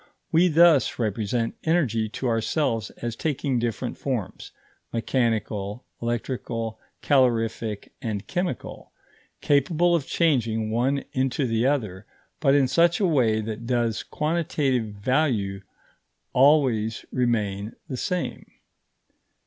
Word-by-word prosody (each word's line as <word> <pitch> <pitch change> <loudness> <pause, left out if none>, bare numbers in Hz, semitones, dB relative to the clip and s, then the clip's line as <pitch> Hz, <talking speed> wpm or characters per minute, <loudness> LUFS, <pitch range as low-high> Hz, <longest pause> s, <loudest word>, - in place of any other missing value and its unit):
We 170 +3 +5
thus 165 -4 +5
represent 115 +1 -1
energy 125 -10 +1
to 130 - -4
ourselves 115 0 0
as 120 -1 -2
taking 140 -2 -1
different 120 +1 -3
forms 125 -9 -4 0.4
mechanical, 115 -3 -1 0.2
electrical, 115 -1 -3 0.2
calorific, 115 -5 +1
and 110 -5 -3
chemical 175 -7 -4 0.5
capable 155 +5 +3
of 160 -6 0
changing 115 -9 +1
one 130 +5 +1
into 130 +1 0
the 115 +1 +1
other, 105 -9 -2 0.3
but 140 -2 +4
in 140 -2 +4
such 170 +5 +3
a 200 - +2
way 120 -10 +2
that 110 +2 -6
the 120 -3 0
quantitative 150 -6 0
value 105 -4 0 0.7
always 130 -6 +3
remains 110 -4 -1
the 130 - -4
same. 180 +4 -3
120 Hz, 110 wpm, -25 LUFS, 110-145 Hz, 0.7 s, We